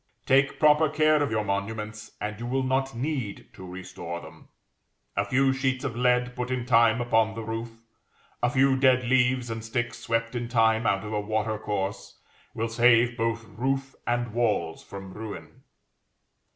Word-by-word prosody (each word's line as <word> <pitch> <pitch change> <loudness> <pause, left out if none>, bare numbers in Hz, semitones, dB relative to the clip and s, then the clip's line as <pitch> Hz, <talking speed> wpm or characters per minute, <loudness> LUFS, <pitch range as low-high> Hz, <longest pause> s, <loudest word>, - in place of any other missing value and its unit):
Take 135 +1 +3
proper 150 0 +5
care 155 0 +3
of 145 - +1
your 110 -1 0
monuments, 105 +1 -4
and 105 0 -4
you 120 - -5
will 130 +2 0
not 130 0 0
need 130 -5 -3
to 95 - -11
restore 90 -2 -7
them. - - -14 0.7
A 100 - +1
few 135 +5 +2
sheets 130 0 -1
of 130 -5 -3
lead 125 0 +2
put 125 0 -3
in 130 -2 -2
time 115 -1 +4
upon 115 -2 +2
the 115 - -5
roof, 115 +1 -4 0.7
a 120 - +3
few 130 +2 +3
dead 130 -1 +4
leaves 125 -1 +2
and 115 -1 -5
sticks 120 +1 -3
swept 115 0 -1
in 120 -1 -3
time 115 -1 +3
out 100 0 +1
of 105 0 -6
a 105 - 0
water 110 +1 -1
course, 100 -2 -4 0.4
will 115 - -1
save 120 +1 +4
both 115 -1 -1
roof 135 +4 -2
and 120 -2 -1
walls 105 -9 0
from 95 -1 -9
ruin. 110 -1 -8
115 Hz, 170 wpm, -26 LUFS, 110-130 Hz, 0.7 s, proper